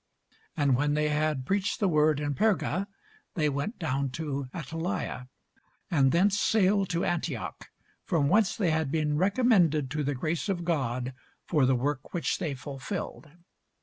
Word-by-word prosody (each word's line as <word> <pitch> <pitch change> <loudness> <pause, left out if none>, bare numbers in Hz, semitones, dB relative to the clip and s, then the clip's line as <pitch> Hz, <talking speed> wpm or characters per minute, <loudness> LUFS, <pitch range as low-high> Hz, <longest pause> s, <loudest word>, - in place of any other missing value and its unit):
And 140 -4 +3
when 145 +3 +1
they 150 0 +1
had 150 -3 0
preached 195 +3 0
the 205 - +2
word 155 -3 +3
in 145 -1 -1
Perga, 200 0 +1 0.5
they 155 -4 +2
went 145 - -3
down 140 -5 -1
into 140 -1 -4
Attalia: 165 -4 -4 0.6
and 135 -5 +4
thence 195 +4 +3
sailed 200 -2 +3
to 170 0 0
Antioch, 165 -8 -3 0.3
from 150 -5 +1
whence 205 +4 +3
they 185 -6 +1
had 160 -2 0
been 150 -1 +1
recommended 180 - +3
to 150 0 -1
the 145 0 -1
grace 160 +8 -2
of 175 -3 -1
God 130 -6 -1 0.3
for 150 -6 +2
the 130 - +3
work 135 +4 -2
which 170 - 0
they 160 -7 -2
fulfilled. 140 +5 -6
155 Hz, 155 wpm, -28 LUFS, 140-180 Hz, 0.6 s, and